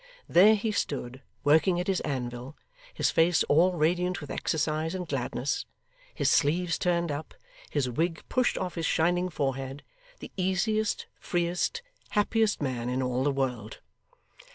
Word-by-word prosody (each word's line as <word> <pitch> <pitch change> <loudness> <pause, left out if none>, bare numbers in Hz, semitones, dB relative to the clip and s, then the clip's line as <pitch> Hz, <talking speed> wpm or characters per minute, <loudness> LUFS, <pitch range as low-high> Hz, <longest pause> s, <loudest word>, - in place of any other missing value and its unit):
There 205 +5 +7
he 215 +1 -1
stood 130 -9 -3 0.2
working 160 +5 +4
at 180 - -1
his 190 -1 +1
anvil, 125 0 -4 0.3
his - - 0
face 165 +1 +3
all 175 +5 +4
radiant 175 +3 +1
with 145 - -8
exercise 160 +2 -1
and 180 -2 -4
gladness, 135 0 -2 0.5
his - - 0
sleeves 165 +3 +2
turned 170 -3 +1
up, 145 +2 -6 0.3
his 145 -4 0
wig 165 +7 -1
pushed 255 -1 +1
off 180 -1 -3
his 165 -2 -2
shining 175 +2 +2
forehead 135 -2 -3 0.4
the - - -9
easiest, 200 +3 0
freest, 175 - -1 0.3
happiest 210 -3 +1
man 125 -3 -2
in 130 +1 -1
all 125 0 0
the 145 - +2
world. 125 -6 -3
160 Hz, 145 wpm, -28 LUFS, 135-180 Hz, 0.5 s, There